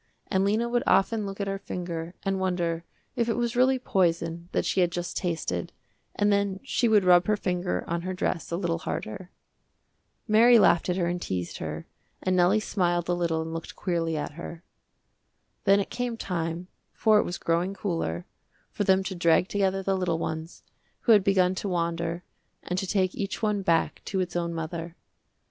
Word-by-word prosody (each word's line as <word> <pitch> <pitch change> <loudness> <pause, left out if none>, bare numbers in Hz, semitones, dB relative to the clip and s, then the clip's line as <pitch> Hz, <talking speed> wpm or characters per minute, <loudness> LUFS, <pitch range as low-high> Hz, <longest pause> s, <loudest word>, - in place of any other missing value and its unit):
And 190 -2 +3
Lena 215 +4 +1
would 240 0 +1
often 210 +1 +3
look 195 +1 -7
at 200 - -1
her 195 0 -3
finger 175 -2 -5
and 195 -1 0
wonder 175 -3 -1 0.3
if 235 -1 0
it 230 - 0
was 240 0 -1
really 260 +2 +4
poison 170 -6 0
that - - 0
she 190 - +2
had 175 -1 +2
just 175 0 -4
tasted 160 - -2 0.4
and 205 0 +2
then 200 -1 0
she 255 -2 +1
would 215 -3 +5
rub 180 -1 +5
her 210 -1 +2
finger 180 - -1
on 170 0 -1
her 185 +1 -4
dress 180 -2 -2
a 170 - -1
little 170 -2 -1
harder. 170 +2 -5 1.0
Mary 235 +2 +7
laughed 180 -5 +4
at 180 - +1
her 180 -2 0
and 175 +1 -2
teased 90 - -3
her 80 0 -5 0.3
and 185 0 0
Nellie 180 +4 +4
smiled 175 -5 0
a - - +3
little 170 -2 0
and 160 0 -6
looked 165 0 -6
queerly 165 -3 -1
at 150 - -3
her. 170 +2 -9 1.0
Then 200 0 +6
it 200 - -3
came 245 -1 -2
time, 170 -3 -3 0.3
for 215 -1 +4
it - - +3
was 175 - -4
growing 175 +4 0
cooler, 165 - -2 0.5
for - - -1
them 190 -1 +3
to 190 - -4
drag 170 +1 +3
together 195 -1 0
the 195 0 +1
little 180 -3 0
ones, 160 0 -5 0.4
who 235 - +3
had 210 -3 +7
begun 185 -2 +3
to 195 +2 -3
wander, 170 0 -1 0.4
and 180 +1 -2
to 190 - -3
take 185 -1 +1
each 200 +3 -4
one 210 -2 +1
back 165 -3 +1
to 195 - -2
its 180 -1 -2
own 170 -1 -1
mother. 165 +1 -5
180 Hz, 195 wpm, -27 LUFS, 170-200 Hz, 1.0 s, Mary